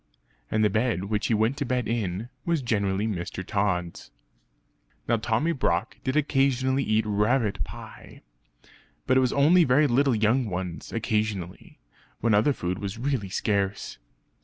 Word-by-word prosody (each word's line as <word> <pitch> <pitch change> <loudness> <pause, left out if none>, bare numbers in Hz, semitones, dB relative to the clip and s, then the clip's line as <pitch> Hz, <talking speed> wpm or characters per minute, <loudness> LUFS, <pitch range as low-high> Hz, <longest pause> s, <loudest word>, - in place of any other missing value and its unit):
And 110 0 +1
the - - +4
bed 110 -2 0
which 105 -1 0
he 115 - +2
went 110 +5 +1
to 145 - -1
bed 125 -2 -1
in, 110 -1 -2
was 165 -3 0
generally 100 -3 0
Mr. 95 -3 -4
Tod's. 90 -4 -2 1.0
Now 115 - +2
Tommy 115 +9 0
Brock 110 - -1
did 130 +1 -1
occasionally 135 -2 +2
eat 110 -1 +1
rabbit 105 +1 +1
pie; - - -11 0.8
but 130 - +2
it - - +6
was 130 -1 +1
only 160 +6 +5
very 140 +2 +4
little 135 -1 +3
young 110 +3 +2
ones 90 -2 -5
occasionally, 105 -5 -3 0.4
when 115 -1 +2
other 105 +8 +4
food 90 -7 -3
was 100 +1 -5
really 125 -5 -2
scarce. 100 - -2
110 Hz, 150 wpm, -26 LUFS, 100-130 Hz, 1.0 s, it